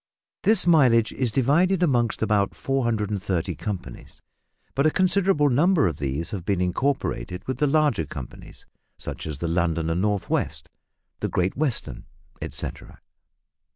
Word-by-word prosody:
This 215 -3 +4
mileage 130 -10 +4
is 125 -4 -1
divided 170 - +2
amongst 120 -9 +1
about 105 -3 +1
430 105 -8 -1
companies, 90 - -7 0.5
but 140 +3 +2
a - - +5
considerable 185 -4 +2
number 160 - +3
of 80 -6 -1
these 70 +4 -3
have 95 -5 -4
been 95 +1 0
incorporated 90 - -2
with 130 - -3
the 150 - +3
larger 140 - +2
companies, 65 -3 -10 0.3
such - - -6
as 75 -3 -4
the 85 - -3
London 85 -1 0
and 85 +2 0
North 105 -1 0
west, - - -2 0.5
the - - -2
Great 90 +1 0
Western, 115 - -2 0.4
etcetera. - - -6
110 Hz, 140 wpm, -24 LUFS, 85-145 Hz, 0.5 s, a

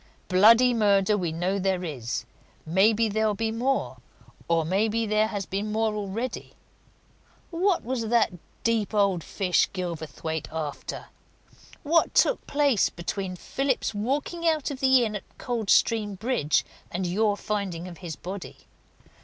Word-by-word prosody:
"Bloody 225 +7 +6
murder 205 -2 +3
we 180 -5 -1
know 180 +5 -1
there 190 -1 0
is 130 -9 -4 0.4
maybe 210 +7 +3
there'll 215 0 +1
be 225 +1 -1
more, 255 +4 -1 0.5
or 165 -1 +2
maybe 215 +6 +1
there 215 0 +2
has 205 -3 -4
been 200 +3 -3
more 220 0 +1
already. 210 +4 -4 1.0
What 360 +2 +1
was 235 -2 -2
that 230 -3 +2 0.3
deep 225 -2 0
old 195 -5 +2
fish 185 0 +1
Gilverthwaite 160 -3 -4
after? 155 -3 -5 0.7
What 330 +2 +2
took - - +3
place 285 -7 +2
between 185 +2 -4
Phillips's 265 +8 -1
walking 285 +10 -2
out 310 -2 0
of 270 - -6
that 265 - +2
inn 245 -5 +4
at 205 - -9
Coldstream 220 -2 +1
Bridge 220 - 0 0.2
and 180 +2 -3
your 205 +3 +1
finding 195 -5 -3
of 175 -3 -10
his 170 -4 -6
body? 185 +4 -7
210 Hz, 135 wpm, -26 LUFS, 185-230 Hz, 1.0 s, Bloody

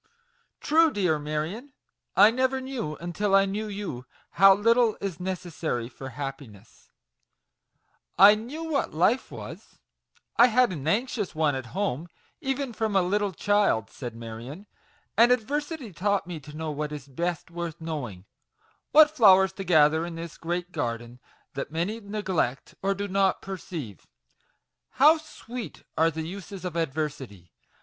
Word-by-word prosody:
" - - -40
True, 325 +2 +4
dear 180 - 0
Marion! 155 - -4 0.4
I 215 - +7
never 260 +2 +1
knew, 260 - -4
until 185 +5 -1
I 195 0 +5
knew 205 +2 -3
you, 195 -12 -6 0.2
how 195 +1 +7
little 230 +2 +3
is 195 -4 -4
necessary 175 -9 -3
for 135 +1 -9
happi 135 0 -6
ness 105 +1 -19
V - - -50 0.2
"I 205 +1 +9
knew 245 +10 -5
what 310 - -2
life 210 +10 +2
was - - -10 0.6
I 240 - +8
had 250 -1 +3
an 150 -4 -5
anxious 210 -1 -1
one 155 -2 +2
at 130 -2 -5
home, 175 -6 -1 0.3
even 270 -3 -2
from 220 -2 -2
a 190 - +4
little 205 +2 0
child," 195 - +1
said 120 -4 -7
Marion, 115 - -8 0.5
"and 235 +2 +6
adversity 280 - -1
taught 200 +2 0
me 175 -2 -6
to 150 +1 -11
know 160 -1 -3
what 150 0 -3
is 145 -2 -7
best 170 +5 -3
worth 170 -1 -5
knowing; 135 - -5 0.6
what 305 0 +7
flowers 190 -6 +6
to 195 - -6
gather 160 -3 +4
in 170 -1 -5
this 165 -1 -7
great 175 +2 -4
garden, 120 -4 -4 0.3
that 135 - -4
many 175 +8 -2
neglect, 190 - -2
or 195 +1 +1
do 200 +1 -3
not 195 -1 +2
perceive. 165 - -7 0.9
How 300 +4 +6
sweet 250 -6 -9
are 160 +1 +4
the 160 0 -5
uses 195 +1 -8
of 175 -2 -4
adversity 135 - -4
180 Hz, 155 wpm, -26 LUFS, 150-210 Hz, 0.9 s, I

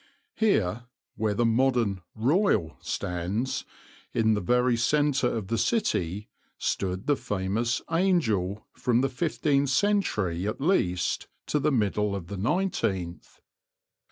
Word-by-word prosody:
Here, 120 - +1 0.3
where 105 -1 0
the 120 - +2
modern 115 -5 +2
"Royal" 125 - +2
stands, 90 +9 -2 0.5
in 110 -2 +3
the 105 - 0
very 125 +4 +2
centre 140 +2 +2
of 115 -4 -2
the 115 +2 -1
city, 105 - 0 0.3
stood 95 0 -2
the 145 - +3
famous 105 +3 -1
"Angel" 115 - +1
from 120 0 +1
the 135 - +1
fifteenth 140 0 0
century 125 - +1
at 105 - -3
least 90 - +1 0.2
to 150 - 0
the 150 +2 +1
middle 105 -4 +1
of 85 -4 -6
the 100 - -5
nineteenth. 100 - -2
115 Hz, 125 wpm, -27 LUFS, 95-140 Hz, 0.5 s, in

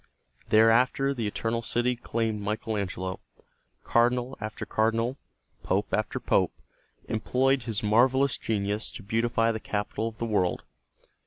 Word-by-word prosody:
Thereafter 120 +5 +4
the 115 -5 -2
Eternal 115 +3 -2
City 120 +2 0
claimed 115 -3 -2
Michael 110 +2 -2
Angelo. 95 -2 -3 0.6
Cardinal 125 +2 +2
after 110 0 -5
cardinal, 115 +3 +1 0.5
pope - - -1
after - - 0
pope, - - +2 0.5
employed 130 +4 +1
his 110 -2 -1
marvelous 130 +5 +3
genius 105 0 -1
to 110 - -8
beautify 115 +2 +1
the 110 - -3
capital 105 +2 -2
of 110 -1 -7
the 115 - -2
world. 100 -6 0
115 Hz, 130 wpm, -27 LUFS, 105-120 Hz, 0.6 s, Thereafter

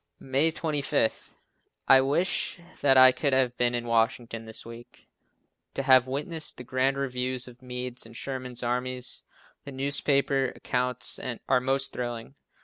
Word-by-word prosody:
May 135 +4 +2
25. 150 -6 -1 0.5
I 135 0 +8
wish 160 +7 0 0.2
that 135 -2 +5
I 130 0 +9
could 140 +1 -1
have 130 -2 +2
been 120 0 +1
in 120 0 -3
Washington 115 0 0
this 110 - -7
week, 115 +1 -13 0.7
to 135 - -2
have 130 -1 +6
witnessed 150 +4 -3
the 125 - -8
grand 130 +2 0
review 130 -1 -2
of 125 0 -11
Meade's 125 0 -5
and 115 +1 -12
Sherman's 130 -3 -5
armies. 125 +1 -2 0.4
The 140 - -8
newspaper 140 0 +1
accounts 125 0 -2 0.3
are 130 -1 +3
most 135 +1 +1
thrilling. 120 0 -5
130 Hz, 140 wpm, -27 LUFS, 125-135 Hz, 0.7 s, I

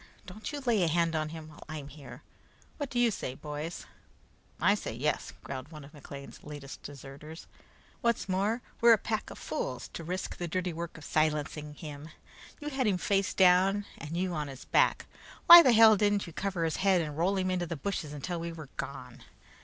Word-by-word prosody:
Don't 200 +8 -7
you 290 -1 -5
lay 235 -6 +2
a 175 - +3
hand 165 0 +1
on 155 -1 -1
him 160 -1 -8
while 150 - -13
I'm 155 -3 -6
here! 145 0 -12 0.5
What 285 -3 -4
do 250 - -4
you 240 -1 +4
say, 130 -9 -4
boys?" 150 +4 -6 0.7
"I 205 - +4
say 205 - -4
yes," 150 +5 -1
growled 130 +2 -7
one 150 -2 -9
of 140 - -14
McLean's 140 -1 -10
latest 145 -2 -9
deserters. 145 +3 -10 0.6
"What's 235 -3 +1
more, 200 +6 0 0.2
we're 235 0 +8
a - - +5
pack 220 +1 -3
of - - -9
fools - - -4
to 165 - -7
risk 180 +3 -4
the 175 - -3
dirty 180 +1 -2
work 170 0 -6
of 150 - -11
silencing 150 -1 -1
him. 150 0 -8 0.5
You 295 -1 -4
had 265 -4 0
him 195 -3 +2
face 195 +1 0
down 190 +2 +4
and 160 +2 -6
you 185 0 -1
on 150 -2 -2
his 135 -1 -10
back; - - +3 0.4
why 345 0 +13
the 260 - +5
hell 225 -1 +8
didn't 205 0 +2
you 170 - -10
cover 190 -2 -2
his 160 - -1
head 190 -2 +3
and 150 -3 -4
roll 180 +5 +1
him 185 0 0
into 180 -1 -1
the 170 - -3
bushes 155 -1 -3
until 165 +4 -4
we 170 0 -4
were 155 -4 -9
gone? - - -7
170 Hz, 205 wpm, -30 LUFS, 150-200 Hz, 0.7 s, why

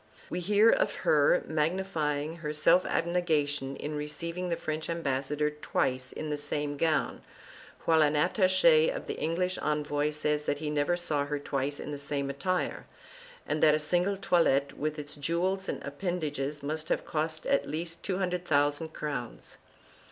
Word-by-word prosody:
We 175 - -1
hear 210 +5 +5
of - - +1
her - - +4
magnifying 155 -2 -1
her 150 -3 -4
self 155 +4 +4
abnegation 150 -6 0
in 150 +2 -5
receiving 170 +4 -4
the 170 - +1
French 155 0 -4
ambassador 150 -2 -1
twice 130 -3 -1
in 155 -1 -5
the 150 - -1
same 145 0 -2
gown, 155 +1 0 0.6
while 160 -1 +5
an 150 0 +3
attache 195 - +4
of - - -4
the - - -5
English 180 +3 -1
envoy 150 0 0
says 150 0 -1
that 145 - 0
he 150 0 -3
never 150 +4 +1
saw 150 -5 -1
her 145 0 -1
twice 140 0 -2
in - - -5
the 145 - -4
same 140 -1 -2
attire, 180 +7 -2 0.6
and 155 - -1
that 150 -1 +6
a - - 0
single 180 +6 +1
toilet, 140 -7 +2
with 155 +1 -2
its 145 -1 -6
jewels 180 +6 -1
and - - -4
appendages 145 -2 -3
must 155 +2 -3
have - - 0
cost 155 0 -2
at 140 - +2
least 165 +3 -4
200,000 170 -5 0
crowns. 140 -6 -5
155 Hz, 160 wpm, -29 LUFS, 145-175 Hz, 0.6 s, that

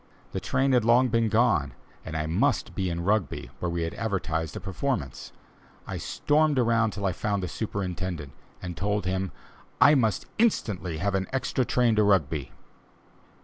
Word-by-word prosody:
The - - -2
train 135 +1 +1
had 125 -3 +4
long 120 +3 +4
been 115 -1 +2
gone, 110 - +2 0.3
and 80 -1 -5
I 75 - -1
must 110 - +1
be 95 -2 -1
in 85 0 -3
Rugby, 95 - 0
where 90 - -1
we 85 0 -1
had 80 - -3
advertised 80 -7 -2
a - - -3
performance. - - -3 0.5
I - - -5
stormed 150 -1 +1
around 115 -2 +3
till 100 0 -4
I 95 - +2
found 100 +1 -2
the - - -1
superintendent, 90 -8 -4 0.3
and 90 -1 -5
told 105 +1 -1
him 95 0 -1 0.5
"I 140 +4 +8
must 110 -9 +2
instantly 100 - +1
have 100 +4 -1
an 95 -1 0
extra 130 0 0
train 120 -2 +2
to 105 - +5
Rugby." 80 -9 +1
100 Hz, 170 wpm, -27 LUFS, 90-120 Hz, 0.5 s, I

